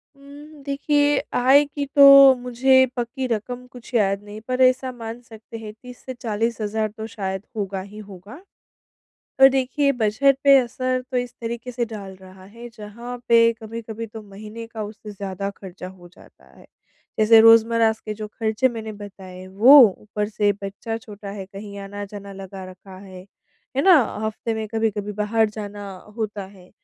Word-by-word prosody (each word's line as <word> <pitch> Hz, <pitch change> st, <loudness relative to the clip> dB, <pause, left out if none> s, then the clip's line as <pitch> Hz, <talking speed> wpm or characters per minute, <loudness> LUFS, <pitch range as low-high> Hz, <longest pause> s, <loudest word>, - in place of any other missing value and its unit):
उम, 285 Hz, +2 st, -14 dB
देखिए 290 Hz, +1 st, +1 dB, 0.2 s
आय 265 Hz, +4 st, +5 dB
की 285 Hz, 0 st, -5 dB
तो 275 Hz, -1 st, +9 dB
मुझे 260 Hz, +2 st, +3 dB
पक्की 250 Hz, +2 st, -3 dB
रकम 245 Hz, +2 st, -4 dB
कुछ 250 Hz, 0 st, -14 dB
याद 200 Hz, -2 st, +1 dB
नहीं 210 Hz, +1 st, -10 dB
पर 255 Hz, 0 st, -1 dB
ऐसा 255 Hz, 0 st, +3 dB
मान 230 Hz, -1 st, -8 dB
सकते 230 Hz, -1 st, -12 dB
हैं 215 Hz, -1 st, -9 dB
30 250 Hz, +2 st, -14 dB
से 260 Hz, -, -5 dB
40 230 Hz, -1 st, -2 dB
हज़ार 215 Hz, +1 st, -1 dB
तो 220 Hz, -, -5 dB
शायद 190 Hz, -3 st, -5 dB
होगा 195 Hz, -2 st, -3 dB
ही 200 Hz, +2 st, -12 dB
होगा। 200 Hz, +1 st, -11 dB, 1.1 s
और 270 Hz, -, +10 dB
देखिए 270 Hz, +2 st, 0 dB
बजट 260 Hz, +6 st, +3 dB
पे 275 Hz, -1 st, +8 dB
असर 255 Hz, +1 st, -1 dB
तो 255 Hz, -, -2 dB
इस 245 Hz, -1 st, -2 dB
तरीके 235 Hz, +1 st, -5 dB
से 240 Hz, 0 st, -1 dB
डाल 205 Hz, -4 st, -9 dB
रहा 185 Hz, 0 st, -15 dB
है, 235 Hz, +5 st, -11 dB
जहाँ 235 Hz, +2 st, -9 dB
पे 230 Hz, 0 st, +5 dB
कभी-कभी 225 Hz, 0 st, -8 dB
तो 220 Hz, 0 st, -10 dB
महीने 210 Hz, +3 st, -10 dB
का 225 Hz, -1 st, -7 dB
उससे 210 Hz, 0 st, -9 dB
ज़्यादा 200 Hz, -1 st, -5 dB
खर्चा 185 Hz, -1 st, -10 dB
हो 180 Hz, -2 st, -15 dB
जाता 180 Hz, -, -21 dB
है। -, -, -17 dB, 0.5 s
जैसे 220 Hz, +1 st, +7 dB
रोज़मर्रा 225 Hz, 0 st, +5 dB
के 215 Hz, -, -5 dB
जो 215 Hz, 0 st, -6 dB
खर्चे 220 Hz, +3 st, 0 dB
मैंने 220 Hz, -2 st, -7 dB
बताए 190 Hz, -3 st, -11 dB
वो, 225 Hz, +10 st, +7 dB, 0.2 s
ऊपर 210 Hz, 0 st, -4 dB
से 210 Hz, -1 st, +1 dB
बच्चा 205 Hz, +3 st, -5 dB
छोटा 210 Hz, -3 st, -10 dB
है 200 Hz, -2 st, -7 dB
कहीं 200 Hz, +1 st, -10 dB
आना-जाना 200 Hz, 0 st, -8 dB
लगा 195 Hz, 0 st, -9 dB
रखा 185 Hz, +1 st, -14 dB
है, 185 Hz, -2 st, -12 dB, 0.5 s
है 275 Hz, -, +2 dB
ना? 375 Hz, -1 st, +7 dB, 0.3 s
हफ़्ते 220 Hz, +1 st, -4 dB
में 220 Hz, 0 st, -4 dB
कभी-कभी 215 Hz, -2 st, -2 dB
बाहर 215 Hz, +2 st, +1 dB
जाना 205 Hz, -1 st, -8 dB, 0.3 s
होता 210 Hz, -3 st, -4 dB
है, 190 Hz, -2 st, -18 dB
220 Hz, 170 wpm, -22 LUFS, 205-245 Hz, 1.1 s, और